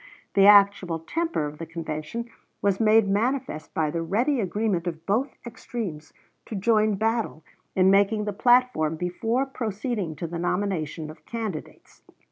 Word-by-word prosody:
The 195 0 +6
actual 200 -4 +6
temper 325 - -2
of 150 0 -7
the 165 - -6
convention 165 +7 -5 0.3
was 200 -1 +1
made 220 -1 +5
manifest 225 - -1
by 155 -2 +1
the 165 +1 -2
ready 240 - +1
agreement 200 -3 -1
of 165 -1 -5
both 245 +7 0
extremes 220 - -6 0.4
to 220 - -5
join 215 +1 +2
battle 220 -6 -1 0.3
in 190 0 +5
making 205 +2 +3
the 210 - -2
platform 240 -9 +3
before 225 +10 -1
proceeding 220 - -3
to 170 - -5
the 170 +1 -5
nomination 170 -4 -2
of 155 0 -17
candidates. 220 -9 -6
200 Hz, 145 wpm, -25 LUFS, 165-225 Hz, 0.4 s, The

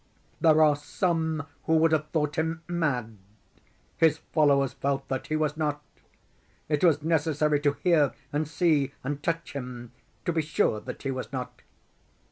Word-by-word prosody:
There 155 -1 +5
are 150 -1 +5
some 160 0 -1 0.2
who 160 - +3
would 160 0 +4
have 155 -1 +1
thought 150 -2 -1
him 160 +1 -2
mad. 130 - -2 0.8
His 160 -1 +4 0.2
followers 140 -3 +3
felt 135 0 -2
that 130 -1 -3
he 155 - -1
was 155 -1 0
not. 150 -2 -2 0.8
It 150 +1 0
was 155 -4 +4
necessary 155 -2 +1
to 145 -1 +1
hear 160 -6 +4 0.2
and 150 +1 0
see 150 -4 +1
and 145 +2 -3
touch 165 +1 -2
him 125 -3 -7 0.3
to 175 - 0
be 160 - +1
sure 150 -7 +1
that - - -8
he 135 - -1
was 130 -1 -5
not. 125 -2 -6
150 Hz, 160 wpm, -27 LUFS, 140-160 Hz, 0.8 s, There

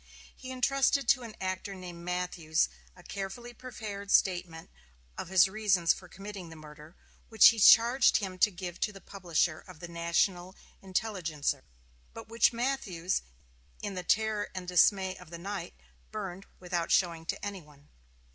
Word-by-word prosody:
He 260 - -10
intrusted 270 +2 +1
to 255 - +5
an 230 -3 -9
actor 190 +1 -4
named 175 -2 -9
Matthews 175 - 0 0.3
a - - -16
carefully 200 +5 -6
prepared 215 -5 -8
statement 175 -4 +1 0.4
of - - -6
his 185 -1 +5
reasons 190 -4 +2
for 180 - -12
committing 195 -1 -9
the 160 - -11
murder, 155 +1 -13 0.3
which 220 -3 +8
he 230 - -1
charged 235 +5 +7
him 190 -3 -5
to 210 - +5
give 180 -2 -7
to - - 0
the 195 - -12
publisher 175 -4 -1
of 185 -4 -14
the 175 - -7
"National 175 +2 0 0.3
Intelligencer," 180 -8 -2 0.5
but - - -9
which 230 +1 +4
Matthews, 230 -8 -1 0.6
in 205 - -3
the 185 - -4
terror 215 +2 +1
and 185 -1 -6
dismay 190 +1 +3
of 180 -3 -14
the 170 - -7
night, 190 0 -6 0.4
burned 195 -3 -6
without 175 -2 -2
showing 170 -3 +2
to - - -3
any 200 -2 -5
one. 145 -2 -20
185 Hz, 155 wpm, -30 LUFS, 170-210 Hz, 0.6 s, which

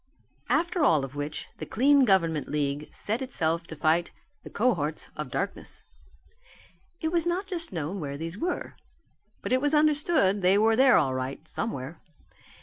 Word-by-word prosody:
After 340 0 +1
all 155 - +4
of 135 - -11
which 145 +1 -5
the - - -4
Clean 275 +3 +4
Government 165 - +2
League 145 0 -2
set 220 +5 -3
itself 170 -10 -1
to 160 - -8
fight 160 +3 +1 0.3
the - - -9
cohorts 170 -10 0
of 150 -3 -5
darkness. 195 +9 -4 1.2
It 320 -1 -1
was 340 -1 +1
not 360 +3 -1
just 350 -4 -2
known 170 +2 -4
where 140 -3 -5
these 165 +3 -5
were. 345 - -3 0.7
But - - -1
it 255 - +3
was 290 +1 +2
understood 300 - +3
that - - -6
they 185 +2 +4
were 220 +2 +4
there 260 +1 +6
all 135 -5 +2
right, 130 +1 -5
somewhere. 155 - -5
190 Hz, 165 wpm, -27 LUFS, -, 1.2 s, there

